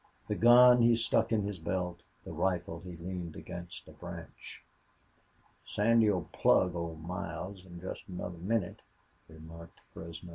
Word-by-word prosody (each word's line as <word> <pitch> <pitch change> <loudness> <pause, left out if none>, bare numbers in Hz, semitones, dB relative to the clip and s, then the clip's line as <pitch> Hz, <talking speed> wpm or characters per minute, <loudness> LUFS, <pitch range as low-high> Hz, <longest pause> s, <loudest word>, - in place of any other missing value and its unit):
The - - 0
gun 120 +2 +8
he 115 0 +6
stuck 115 - +1
in 110 -2 +2
his 100 -2 -4
belt; 90 +1 -2 0.3
the - - -7
rifle 90 -3 -1
he 90 0 -9
leaned 85 -1 -6
against 85 0 -8
a - - -11
branch. - - -9 1.0
"Sandy'll 105 -4 +3
plug 90 -1 +4
Old 85 -2 -5
Miles 90 +1 -5
in 85 -1 -10
jest 95 - -7
another 90 -2 -6
minnit," 95 +1 -1 0.5
remarked 80 +1 -12
Fresno. 85 +1 -9
90 Hz, 140 wpm, -31 LUFS, 85-105 Hz, 1.0 s, gun